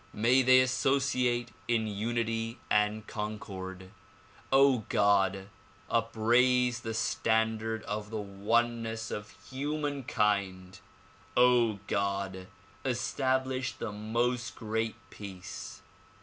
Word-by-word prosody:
May 120 +5 +4
they 130 0 +7
associate 125 -1 +1 0.2
in 115 -2 +1
unity 115 +2 -2
and 105 +1 +2
concord. 95 -4 -6 0.6
God! 100 -8 +3 0.4
upraise 120 +2 +3
the 115 -1 -5
standard 110 0 0
of 105 0 -4
the 110 - -4
oneness 115 +2 -1
of 105 0 -6 0.2
humankind. 115 -10 -1 1.1
God! 100 -2 -2 0.4
establish 130 0 0
the 115 - -5
"Most 120 +3 -1
Great 110 0 -2 0.2
Peace." 95 -1 -8
110 Hz, 80 wpm, -30 LUFS, 105-125 Hz, 1.1 s, they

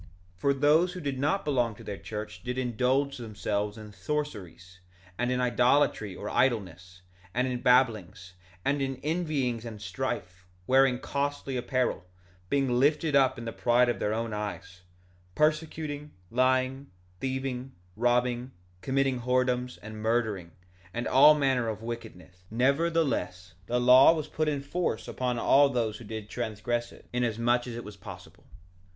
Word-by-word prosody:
1:32 - - -18 0.3
For 140 +9 +2
those 155 +6 +3
who 180 - -6
did 140 -5 -3
not 150 +8 0
belong 120 -6 +1
to - - -13
their 100 - -5
church 105 -4 -7
did 125 +1 -4
indulge 130 +3 0
themselves 105 -2 -3
in 105 -1 -10
sorceries, 95 - -5 0.4
and 125 +4 -1
in 125 - 0
idolatry 125 -4 +2
or 105 - -6
idleness, 90 -8 -1 0.3
and 125 +1 +1
in 125 -1 -3
babblings, 110 -8 +2 0.3
and 140 +1 +1
in 135 0 -1
envyings 150 -8 -1
and 115 -3 -7
strife; 95 -4 -5 0.2
wearing 130 +1 +4
costly 140 0 -3
apparel; 125 -2 -1 0.5
being 135 -3 +1
lifted 150 +2 +2
up 130 -2 +4
in 115 - -7
the 115 - -4
pride 120 +1 +3
of 120 - -1
their 105 - 0
own 115 0 -2
eyes; 105 -3 -6 0.5
persecuting, 150 -1 -1 0.2
lying, 130 +2 +1 0.3
thieving, 130 -1 -3 0.2
robbing, 120 +2 +1 0.3
committing 135 0 +1
whoredoms, 125 0 0
and 110 0 -8
murdering, 110 -6 0 0.5
and 120 - -2
all 145 +4 +7
manner 135 -5 +1
of 110 0 -4
wickedness; 110 -6 -8
nevertheless, 130 - 0
the 120 +1 +1
law 125 +4 +8
was 155 -3 -2
put 155 0 -2
in 145 -2 -2
force 140 -8 -2
upon 125 -1 -2
all 140 +4 +5
those 115 -5 -1
who - - -10
did 110 -1 -6
transgress 120 +1 -3
it, - - -17
inasmuch 120 0 +1
as 120 - -5
it 120 - -6
was 105 0 -9
possible. 90 - -12
125 Hz, 150 wpm, -28 LUFS, 110-135 Hz, 0.5 s, law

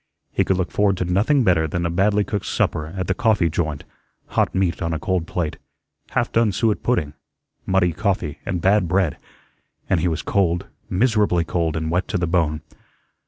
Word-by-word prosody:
He - - +2
could 95 - +1
look 90 -2 -2
forward 100 -2 +2
to 90 - -1
nothing 110 +11 +2
better 85 -6 +3
than 85 +3 -2
a 85 - 0
badly 100 +4 +2
cooked 100 -1 -3
supper 75 -1 0
at 95 - -1
the - - 0
coffee 105 -8 +2
joint 80 -3 -2 0.5
hot - - 0
meat 95 -2 0
on 85 -1 -1
a - - -3
cold 90 +1 -1
plate, 80 -4 -2 0.5
half - - 0
done 115 -2 +3
suet 105 +2 0
pudding, 85 -12 0 0.5
muddy 95 -3 +2
coffee, 95 -7 -1
and 90 -4 -3
bad 95 -1 +3
bread, 90 -4 +1 0.7
and 95 - +2
he 85 - +1
was 80 -3 -2
cold, 90 -4 +1 0.2
miserably 105 -4 +2
cold, 80 -3 -1
and 80 0 -2
wet 90 +1 0
to 100 - -1
the 90 - 0
bone. 80 -3 0
90 Hz, 190 wpm, -22 LUFS, 85-100 Hz, 0.7 s, better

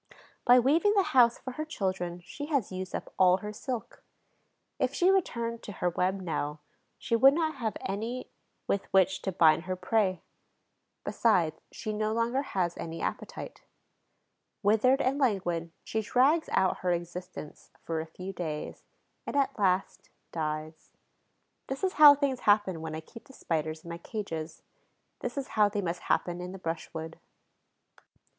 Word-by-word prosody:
By 245 0 +8
weaving 325 - +3
the 395 - +5
house 240 -2 +6
for 260 - -7
her 305 +5 -4
children 185 - -3
she 290 +10 -7
has 280 -11 0
used 185 0 -5
up - - -6
all 185 -1 +6
her 210 +2 -6
silk. 245 +2 -6 0.8
If - - 0
she 365 +1 +4
returned 235 -11 0
to 205 - -8
her 180 -1 -1
web 185 +3 0
now, 150 -4 -3 0.4
she 230 - -1
would 270 +4 +7
not 315 -3 0
have 225 -4 -2
any 225 +6 -4 0.3
with 200 - -2
which 190 0 +3
to 190 - -2
bind 165 -1 +4
her 185 0 -2
prey. 185 -2 0 0.8
Besides, 175 -9 +1
she 215 - -5
no 215 +1 0
longer 235 +4 +1
has 180 -10 -1
any 165 0 -5
appetite. - - -5 1.0
Withered 225 +7 +4
and 270 +3 +1
languid, 175 - 0
she 220 - -2
drags 265 +9 +3
out 190 - +2
her 180 - -1
existence 175 -2 -6
for 165 -1 -2
a 160 - -7
few 185 +4 -7
days 160 -4 -5 0.5
and, - - -4
at 275 -3 +1
last, 190 -1 0 0.2
dies. 155 0 -4 0.8
This 270 +5 -5
is 375 - +1
how 295 -1 +9
things 275 -3 0
happen 205 -5 +2
when 160 -1 -5
I 160 - -5
keep 230 +8 -14
the 270 - -16
Spiders 155 - -3
in 170 - -10
my 170 - -6
cages; 165 -6 -5 0.6
this 245 +2 -5
is 275 - -3
how 210 -1 +3
they 205 0 -2
must 175 0 -2
happen 175 0 0
in 180 +1 -6
the - - -7
brushwood. 165 -2 -5
195 Hz, 165 wpm, -29 LUFS, 170-250 Hz, 1.0 s, how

